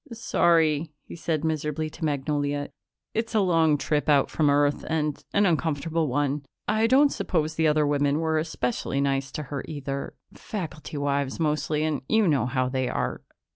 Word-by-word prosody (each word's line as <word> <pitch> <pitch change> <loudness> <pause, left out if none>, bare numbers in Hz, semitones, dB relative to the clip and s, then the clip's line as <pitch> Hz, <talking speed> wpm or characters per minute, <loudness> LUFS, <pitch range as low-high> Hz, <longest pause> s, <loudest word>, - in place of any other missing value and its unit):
"Sorry," 165 -8 +2
he - - -10
said 160 -2 -2
miserably 155 -1 -1
to 165 - -9
Magnolia. 145 -1 -1 0.4
"It's 225 0 -2
a - - +5
long 165 -5 +3
trip 150 +1 -1
out 145 -2 +4
from 150 -2 +2
Earth 145 0 +2
and 150 -2 -1
an 205 0 +3
uncomfortable 160 -1 0
one. 145 +2 0 0.2
I 220 +2 +2
don't 280 +4 +5
suppose 160 -3 -1
the 160 0 +2
other 150 0 +3
women 145 0 +1
were 160 -1 +1
especially 135 -4 -2
nice 135 -1 0
to 150 - -4
her, 140 - -3
either. 140 -3 -5 0.2
Faculty 160 -7 -6
wives 140 0 -1
mostly 155 -1 0
and 155 -2 -1
you 220 -3 +4
know 140 -7 +2
how 130 0 0
they 130 -1 -1
are.... - - -2
150 Hz, 170 wpm, -26 LUFS, 145-160 Hz, 0.4 s, a